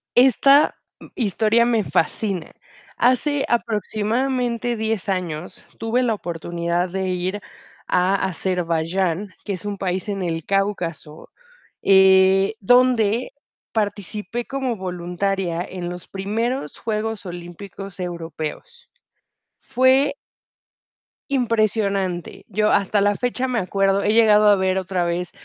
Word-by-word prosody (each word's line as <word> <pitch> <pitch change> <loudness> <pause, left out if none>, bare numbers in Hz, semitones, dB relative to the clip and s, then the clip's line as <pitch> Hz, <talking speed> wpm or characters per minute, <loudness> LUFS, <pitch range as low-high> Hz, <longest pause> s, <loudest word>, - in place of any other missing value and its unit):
Esta 275 +4 +5 0.2
m - - -13
historia 225 +1 +2
me 230 -3 +2
fascina. 185 0 -1 0.5
Hace, 275 +3 +2
aproximadamente, 235 +2 -1
10 220 -2 -2
años, 180 -3 -4
tuve 225 +3 0
la 235 -3 +1
oportunidad 170 0 -2
de 190 +1 -2
ir 185 +3 -2 0.5
a 185 +2 +2
Azerbaiyán, 180 0 -1 0.2
que 200 - -2
es 185 - -7
un 205 -1 -3
país 190 +2 -2
en 195 -2 -2
el 165 -2 -2
Cáucaso, 180 -6 -2 0.5
eh, 190 +1 +5
donde 245 0 +3 0.4
participé 210 +1 -3
como 265 -3 -2
voluntaria 180 -1 -2
en 180 -1 -6
los 175 -1 -8
primeros 215 - -3
Juegos 220 -1 -3
Olímpicos 180 +3 -9
Europeos. 170 - -6 0.7
Fue 265 +2 +2 1.1
impresionante. 215 -8 0
Yo, 210 +1 +1
hasta 200 0 +2
la 205 0 +3
fecha, 250 +1 -1
me 245 -2 0
acuerdo 195 +1 +1
he 210 +1 +2
llegado 215 -2 +5
a 205 - +7
ver 190 -1 0
otra 185 -1 -1
vez 175 +1 -2
200 Hz, 115 wpm, -22 LUFS, 180-225 Hz, 1.1 s, a